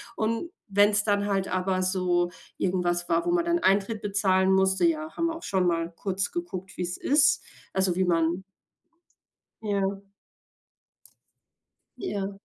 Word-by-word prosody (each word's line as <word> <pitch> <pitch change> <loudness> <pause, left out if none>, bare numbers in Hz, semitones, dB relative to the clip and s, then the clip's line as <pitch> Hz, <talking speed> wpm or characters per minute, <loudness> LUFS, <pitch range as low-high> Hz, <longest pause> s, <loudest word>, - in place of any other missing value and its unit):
Und 230 +10 -2 0.2
wenn 205 +1 +6
es 205 0 +2
dann 205 -1 +1
halt 195 -1 0
aber 185 0 0
so 180 -2 +1 0.3
irgendwas 175 -1 0
war, 165 0 +2
wo 345 - +1
man 350 -1 +2
dann 340 0 +2
Eintritt 205 +1 +1
bezahlen 190 -2 +2
musste, 190 - +3
ja, 315 -1 -1
haben 335 - +1
wir 330 - -3
auch 325 - -10
schon 185 -2 +1
mal 165 0 0
kurz 195 0 -2
geguckt, 195 - -6
wie - - -4
es 180 0 -3
ist, 290 +1 +3 0.3
also, 190 -2 +1
wie 185 - +2
man 170 +1 +1 1.2
Ja. 200 -2 -1 2.0
Ja. 200 - -3
195 Hz, 150 wpm, -27 LUFS, 185-210 Hz, 2.0 s, wenn